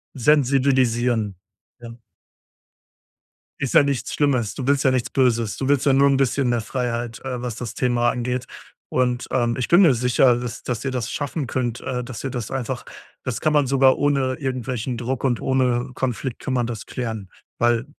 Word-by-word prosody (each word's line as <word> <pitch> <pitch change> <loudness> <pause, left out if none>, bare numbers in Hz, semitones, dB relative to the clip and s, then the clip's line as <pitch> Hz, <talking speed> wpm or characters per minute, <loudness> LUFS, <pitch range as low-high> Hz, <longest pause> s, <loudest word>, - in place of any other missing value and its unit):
Sensibilisieren, 125 -5 +2 0.4
ja. 115 -1 -10 1.6
Ist 140 - -2
ja - - +7
nichts 140 -3 -2
Schlimmes. 130 -7 +1
Du 130 - -4
willst 140 -1 +3
ja 130 - +4
nichts 125 -1 0
Böses, 120 -5 +1
du 135 - -2
willst 140 0 +2
ja 140 - +4
nur 140 +1 +5
'n 135 - +3
bisschen 135 -1 +1
mehr 120 -1 +1
Freiheit, 120 0 -3
äh, 125 -2 -4
was 125 -2 -4
das 120 -2 -6
Thema 120 -1 +2
angeht, 125 0 -2 0.4
und, 125 -1 0
ähm, 120 -2 +1
ich 125 - -1
bin 175 +3 +6
mir 165 -8 +6
sicher, 125 +1 +3
dass 120 -1 -6
dass 120 -2 -3
ihr 135 - -2
das 125 -2 -3
schaffen 145 -1 -3
könnt, 120 -1 -2
äh, 125 -1 -3
dass 120 -2 -8
ihr 135 - -2
das 120 -3 -4
einfach 130 -1 -3 0.4
das 125 -3 -3
kann 155 - +2
man 145 -2 +3
sogar 135 0 +4
ohne 140 -2 +1
irgendwelchen 130 -2 -3
Druck 125 +1 -3
und 125 -3 +1
ohne 130 -1 +1
Konflikt 130 -1 -3
kann 130 - -3
man 120 -2 +1
das 115 -2 -6
klären, 110 -6 -5 0.3
weil 120 0 +2
125 Hz, 185 wpm, -22 LUFS, 120-135 Hz, 1.6 s, ja